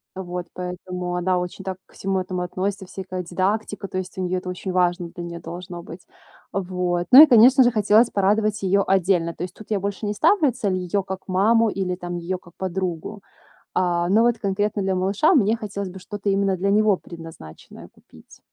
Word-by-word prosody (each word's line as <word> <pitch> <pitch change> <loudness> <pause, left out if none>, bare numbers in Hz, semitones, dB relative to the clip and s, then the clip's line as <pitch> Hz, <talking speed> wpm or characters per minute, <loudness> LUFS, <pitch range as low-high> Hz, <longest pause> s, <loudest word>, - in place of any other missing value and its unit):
Вот, 180 -1 -5
поэтому 180 0 -5
она 180 +1 +1
очень 180 +2 -6
так 190 -1 -4
ко - - -24
всему 195 0 -1
этому 185 -1 -3
относится, 190 +2 -3
всякая 185 0 -6
дидактика. 195 +3 -2
То 185 - -5
есть 185 0 -5
у 185 - -2
неё 185 0 -1
это 180 0 -7
очень 180 +1 -5
важно 175 -1 +1
для 175 - -6
неё 170 0 -7
должно 175 +1 -8
быть. 170 +1 -11 0.5
Вот, 180 -2 -2
ну 275 +4 +12
и - - +10
конечно 255 0 +7
же, 245 - +4
хотелось 215 +2 +4
порадовать 210 +2 +1
её 195 +1 +2
отдельно. 180 -3 +1
То 170 - -6
есть 180 - -6
тут 215 0 -13
я 205 - +1
больше 200 +2 -4
не 205 - -1
ставлю 300 - +3
цель 215 -6 -2
её 185 +2 -1
как 190 0 -6
маму 220 +5 +3
или 190 -3 -2
там 175 -1 -6
её 175 +2 -3
как 175 -1 -19
подругу. 185 +1 -4 0.6
А, 175 -1 +1
но 215 +4 +4
вот 240 -1 +2
конкретно 205 +1 -1
для 190 0 0
малыша 195 - +2
мне 220 -5 +3
хотелось 200 -3 -5
бы 190 - -10
что-то 205 +1 -4
именно 195 -1 +1
для 195 +3 0
него 215 -1 +4
предназначенное 165 - -12
купить. - - -19
190 Hz, 200 wpm, -23 LUFS, 180-205 Hz, 0.6 s, ну